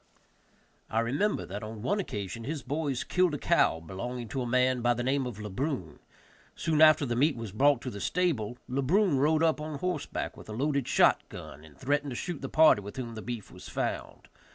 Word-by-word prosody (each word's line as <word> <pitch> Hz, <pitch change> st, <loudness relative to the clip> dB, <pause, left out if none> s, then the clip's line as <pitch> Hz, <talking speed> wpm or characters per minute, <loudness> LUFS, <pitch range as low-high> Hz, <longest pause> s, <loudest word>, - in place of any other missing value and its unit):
I 110 Hz, -, +1 dB
remember 145 Hz, -, 0 dB
that 100 Hz, +3 st, -6 dB
on 110 Hz, 0 st, -7 dB
one 205 Hz, +10 st, +1 dB
occasion 105 Hz, -, -4 dB
his 145 Hz, +1 st, -4 dB
boys 140 Hz, -1 st, -2 dB
killed 180 Hz, -4 st, +2 dB
a -, -, -2 dB
cow 80 Hz, -, +2 dB
belonging 115 Hz, +8 st, -6 dB
to 130 Hz, -, -2 dB
a 120 Hz, -, -2 dB
man 125 Hz, +1 st, +2 dB
by 120 Hz, 0 st, +3 dB
the 120 Hz, -, -2 dB
name 135 Hz, 0 st, +1 dB
of 115 Hz, -4 st, -7 dB
Le 105 Hz, -1 st, -6 dB
Brun; 125 Hz, -, -3 dB, 0.6 s
soon 155 Hz, -2 st, +1 dB
after 155 Hz, -2 st, +7 dB
the 120 Hz, -2 st, -1 dB
meat 145 Hz, +5 st, +3 dB
was 115 Hz, -4 st, -6 dB
brought 135 Hz, +4 st, +3 dB
to 125 Hz, -, -5 dB
the 100 Hz, -, -7 dB
stable, 135 Hz, -11 st, 0 dB
Le 135 Hz, +2 st, -1 dB
Brun 170 Hz, +1 st, +3 dB
rode 155 Hz, +3 st, +3 dB
up 160 Hz, -2 st, +2 dB
on 155 Hz, -1 st, -4 dB
horseback 180 Hz, -1 st, -3 dB
with -, -, -13 dB
a -, -, -5 dB
loaded 140 Hz, +2 st, 0 dB
shot -, -, +4 dB
gun 75 Hz, -, -10 dB
and 80 Hz, -2 st, -16 dB
threatened 145 Hz, +2 st, 0 dB
to 125 Hz, -, -5 dB
shoot 170 Hz, +4 st, -4 dB
the 135 Hz, -, -4 dB
party 155 Hz, -9 st, +6 dB
with 100 Hz, +1 st, -9 dB
whom 120 Hz, -3 st, -5 dB
the 110 Hz, -, -7 dB
beef 115 Hz, -3 st, -6 dB
was -, -, -11 dB
found. -, -, -4 dB
130 Hz, 220 wpm, -29 LUFS, 115-150 Hz, 0.6 s, after